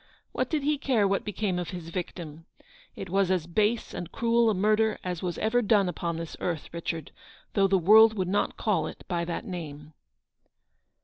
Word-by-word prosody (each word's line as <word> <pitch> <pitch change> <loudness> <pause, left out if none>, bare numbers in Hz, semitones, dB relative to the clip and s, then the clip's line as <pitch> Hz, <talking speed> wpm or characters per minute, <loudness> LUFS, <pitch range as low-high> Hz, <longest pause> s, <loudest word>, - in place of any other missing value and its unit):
What - - -2
did 310 -4 -1
he 295 0 +1
care 240 -8 +2
what 195 0 0
became 205 -3 -2
of 175 - -4
his 175 -3 -7
victim? 165 -2 -6 0.5
It 190 - -6
was 195 +1 +1
as 185 -4 +1
base 210 +6 0
and 175 0 -6
cruel 235 0 +2
a 215 - +1
murder 215 +3 +2
as 180 -2 -4
was 175 -2 -3
ever 225 +3 +1
done 205 -3 +3
upon 170 -2 -3
this 165 -1 -6
earth, 165 -4 -3
Richard, 165 -2 -4 0.4
though 195 -1 +3
the 195 0 +3
world 220 +5 +7
would 185 -3 -1
not 200 +3 0
call 210 -6 0
it - - -9
by 170 -1 -1
that 170 +7 -4
name." 155 -6 -7
190 Hz, 190 wpm, -27 LUFS, 170-215 Hz, 0.5 s, world